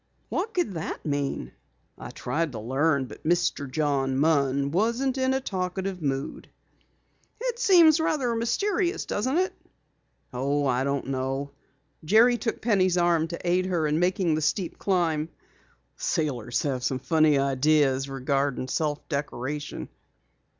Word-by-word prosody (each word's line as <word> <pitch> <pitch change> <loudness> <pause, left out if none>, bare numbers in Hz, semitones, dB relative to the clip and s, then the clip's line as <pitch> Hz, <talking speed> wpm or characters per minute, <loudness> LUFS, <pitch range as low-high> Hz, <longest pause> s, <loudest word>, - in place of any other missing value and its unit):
'" - - -42
"What 430 +5 -2
could 350 - 0
that 160 -2 -5
mean?" 140 - -2 0.4
"I - - -9
tried 150 +4 -2
to 110 - -5
learn, 135 +5 +1
but - - -12
Mr. 170 -4 0
John 135 -2 0
Munn 140 -2 +2
wasn't 235 - +1
in 260 0 +2
a - - +1
talkative 190 -4 -3
mood." 135 -2 -3 0.9
"It 485 0 -3
seems 345 -8 +6
rather 285 -7 0
mysterious, 350 - 0
doesn't 260 +9 -1
it?" 370 +1 +1 0.8
"Oh, 140 +3 0
I 130 -1 +1
don't 140 0 -1
know." 135 +1 -2 0.5
Jerry 230 +8 +5
took 225 - -3
Penny's 185 -5 +2
arm 170 -2 +2
to 170 +1 -6
aid 180 +1 +2
her 175 -4 0
in 150 +1 +1
making 180 -1 +1
the 155 - 0
steep 165 +3 -1
climb. 165 -5 0 0.7
"Sailors 125 -7 -1
have 130 -4 -2
some 130 - 0
funny 155 +1 +3
ideas 135 0 +2
regarding 135 0 -1
self 150 +1 -2
decoration. 145 -1 -4
155 Hz, 140 wpm, -26 LUFS, 140-195 Hz, 0.9 s, seems